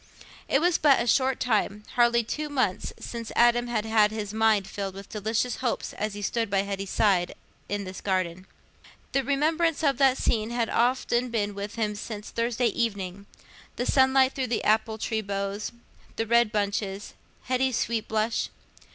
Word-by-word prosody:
It 275 - +2
was 350 0 +3
but 285 -3 +5
a 235 - 0
short 260 +2 +2
time—hardly 235 +1 +1
two 300 +7 -4
months—since 235 -2 -3
Adam 240 0 +4
had 225 -3 -1
had 220 -1 +4
his 215 -1 -5
mind 220 -2 +3
filled 195 -1 -5
with 195 0 -10
delicious 220 +3 -1
hopes 250 -2 -2
as 215 0 -3
he 205 - -6
stood 225 +1 -1
by 195 0 +2
Hetty's 195 -1 -4
side 185 -5 +2 0.3
in 205 0 -2
this 185 -1 -8
garden. 185 -1 -2 0.6
The 275 - +1
remembrance 315 +4 +1
of 275 -4 +2
that 270 -1 +4
scene 220 -1 0
had 235 -1 -1
often 245 0 +1
been 210 -3 -1
with 200 +1 -6
him 215 -2 -1
since 210 0 -7
Thursday 235 +1 0
evening: 200 -3 -3 0.5
the 245 - -2
sunlight 265 0 +4
through 265 -2 -2
the 235 -1 -1
apple 220 +1 +2
tree 220 0 -2
boughs, 200 0 -3 0.4
the 225 - -1
red 235 -1 +3
bunches, 200 -1 -2 0.3
Hetty's 255 -1 +1
sweet 230 -2 -1
blush. 220 +1 0
225 Hz, 165 wpm, -26 LUFS, 205-245 Hz, 0.6 s, but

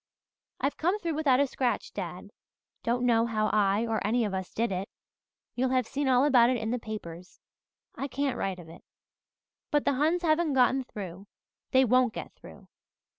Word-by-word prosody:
"I've 280 - -1
come 355 +6 +1
through 340 -6 -3
without 290 -4 +3
a 285 - +4
scratch, 255 -2 -2
dad. - - -6 0.5
Don't 245 +1 0
know 230 -1 +3
how 215 -2 0
I 205 +1 +2
or 225 -1 -1
any 225 +3 +1
of 205 - -3
us 190 -1 -4
did 230 -1 -1
it. 190 +1 -3 0.6
You'll 255 +1 0
have 255 -1 +1
seen 280 +4 -2
all 255 +1 +4
about 245 -5 +5
it 255 - +1
in 225 0 -3
the 250 - -1
papers 180 -6 -8 0.5
I 275 - -4
can't 275 -1 -1
write 195 -4 -2
of 175 -2 -11
it. 165 - -13 0.9
But 295 -1 +1
the - - +3
Huns 315 +6 +1
haven't 315 -1 +2
got 255 0 +3
through 195 -1 -8 0.4
they 260 -1 +4
won't 250 -1 +3
get - - -7
through. - - -15
245 Hz, 185 wpm, -28 LUFS, 215-275 Hz, 0.9 s, about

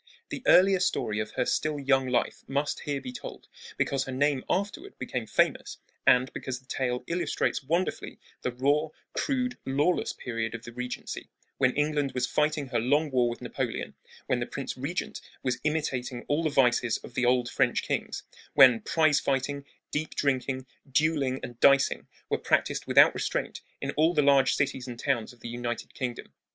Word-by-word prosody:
The - - -5
earlier 190 +1 +6
story 110 - 0
of 110 0 -2
her - - 0
still 150 +2 0
young 135 -1 +2
life 125 -1 0
must 140 +2 -1
here 145 -1 -3
be 130 -2 -7
told, 125 - -9 0.3
because 135 -1 0
her 135 - -5
name 140 0 +1
afterward 205 - -2
became - - -4
famous, - - +1 0.3
and 125 +1 +5
because 130 -1 -4
the 130 - -26
tale 125 -1 -2
illustrates 170 -1 -1
wonderfully 170 +7 -2
well - - -44 0.2
the 125 - -1
raw, 140 +5 +1 0.3
crude, 255 -3 -1
lawless 145 +7 +1
period 115 -1 -4
of 115 - -8
the 120 - -8
Regency, 125 +1 -6 0.3
when 130 -2 +3
England 150 -2 0
was 125 -1 0
fighting 150 0 0
her 120 -2 +1
long 145 +6 +2
war 125 -2 +3
with 120 - -6
Napoleon, - - -3 0.3
when - - 0
the - - -2
Prince - - -5
Regent - - -4 0.2
was 125 -2 -1
imitating 135 -5 -2
all 145 +3 +1
the 160 - +1
vices 125 -4 +3
of - - -12
the 125 - +1
old 125 -1 +3
French - - +1
kings, - - -3 0.3
when 130 -5 +8
prize 155 -3 +3
fighting, 140 +1 -1 0.3
deep 155 +1 -3
drinking, 130 -1 0 0.3
dueling, 140 -2 +1
and 120 -1 -8
dicing 140 +1 +4 0.2
were - - 0
practised - - 0
without - - +7
restraint - - -3 0.2
in - - -3
all 160 +3 +2
the 150 - +4
large 140 -2 +5
cities 135 -2 -1
and 120 -2 -6
towns 120 -3 -1
of 120 -1 -20
the - - -6
United 120 -1 -4
Kingdom. 125 -3 -5
135 Hz, 180 wpm, -28 LUFS, 125-150 Hz, 0.3 s, when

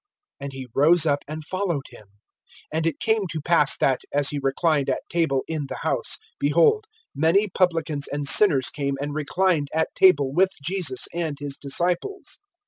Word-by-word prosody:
And 140 0 -6
he 135 -1 -8
rose 160 +3 +4
up 145 -2 0
and 155 +1 -7
followed 180 -6 -2
him. 110 -4 -15 0.7
(10)And 160 +1 0
it 160 - -3
came 220 -3 0
to 160 -2 -4
pass 150 -2 +3
that, 130 -2 +1
as 145 -1 +2
he 145 - -3
reclined 140 +1 0
at 130 - -2
table 160 -6 0
in 155 -3 -4
the - - -6
house, - - -1 0.2
behold, 170 - +3 0.3
many 170 +8 +2
publicans 165 -6 0
and 145 0 -4
sinners 140 -7 +5
came 140 -2 -3
and 145 +1 -4
reclined 155 +1 0
at 160 0 0
table 145 -8 +4
with 190 +4 +2
Jesus 155 -3 -1
and 165 -4 -3
his 145 -1 -5
disciples. 175 - -2
155 Hz, 170 wpm, -23 LUFS, 140-175 Hz, 0.7 s, sinners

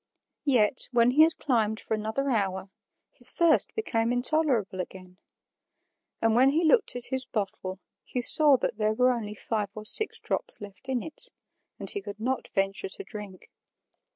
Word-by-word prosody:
Yet, 250 -2 +3
when 240 0 +3
he 295 +5 +4
had 320 0 +4
climbed 220 -5 -1
for - - -5
another 220 +6 -2
hour, 195 -3 -2 0.4
his - - +8
thirst 335 -2 +2
became 230 - -1
intolerable 245 -6 +1
again; 185 0 -12 1.0
and 225 -1 +3
when 255 +4 +4
he 315 +5 0
looked 400 - +2
at 245 -1 0
his 260 0 +1
bottle, 195 -3 -5 0.3
he 250 - -5
saw 285 +3 +6
that - - -3
there 215 0 +1
were 250 +3 +2
only 215 -4 -5
five 210 -1 -3
or 215 0 -9
six 435 - 0
drops - - -3
left 205 +6 -12
in 255 -3 -2
it, 395 +10 -7 0.5
and - - -8
he 405 - -4
could 205 - -9
not 255 +4 -3
venture 195 - -2
to 400 - -6
drink. 205 - -11
235 Hz, 170 wpm, -26 LUFS, 210-275 Hz, 1.0 s, his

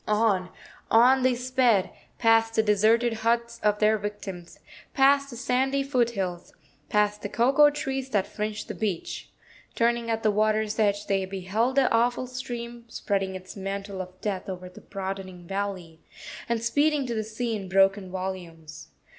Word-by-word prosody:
On, 210 -4 +2 0.4
on 250 +4 +6
they 255 -1 +3
sped, 250 -5 +2 0.3
past 225 -1 +3
the 220 - +4
deserted 220 +3 +3
huts 235 +1 0
of 210 -1 +2
their 215 +1 +3
victims, 195 -4 -7 0.4
past 275 0 +4
the 240 - -8
sandy 265 +3 +1
foothills, 225 -10 -1 0.4
past 210 0 +1
the 205 - -4
cocoa 270 +7 +5
trees 270 -2 -3
that 205 -6 +1
fringed 210 0 -4
the - - -5
beach. 200 -6 -4 0.5
Turning 235 0 +1
at 225 0 -1
the 215 - +4
water's 215 +1 +1
edge, 205 -1 +2
they 195 -1 0
beheld 195 +7 -1
the 275 -2 +4
awful 240 +2 +2
stream 240 -2 -6
spreading 195 -4 -2
its 185 0 -9
mantle 195 0 -4
of 185 0 -10
death 195 -2 -3
over 180 -1 -6
the 180 - -14
broadening 190 -2 -6
valley, 190 -4 -4 0.5
and 230 -1 0
speeding 290 +4 +2
to 240 - -3
the 220 -1 -1
sea 225 +2 -3
in 195 -3 -6
broken 195 0 +3
volumes. 175 -4 -7
215 Hz, 155 wpm, -26 LUFS, 195-240 Hz, 0.5 s, on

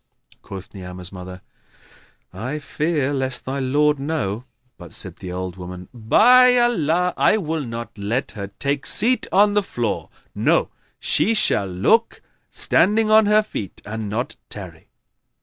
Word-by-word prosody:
Quoth 95 -1 -10
Ni'amah's 90 -2 -8
mother, 90 -1 -9 0.9
"I 125 +10 -4
fear 150 -1 -1
lest 130 -2 -2
thy 135 +2 -3
lord 145 +2 +2
know;" 135 -7 -3 0.3
but 85 -4 -8
said - - -3
the 90 - -7
old 90 0 -5
woman, 90 0 -9
"By 250 - +5
Allah, 180 -7 +2
I 215 - +4
will 160 -5 -2
not 115 -1 -7
let 110 +6 -2
her 100 -2 -6
take 140 +7 -3
seat 240 +2 +2
on 205 +2 +4
the 205 - +3
floor; 120 - -3 0.2
no, - - +2 0.3
she 225 - +2
shall 100 - +3
look, 155 - +1 0.3
standing 215 +2 +2
on 215 -1 +6
her 210 +1 +4
feet, 105 - -7
and 110 0 -5
not 115 +5 -3
tarry." 90 -6 -9
130 Hz, 145 wpm, -21 LUFS, -, 0.9 s, on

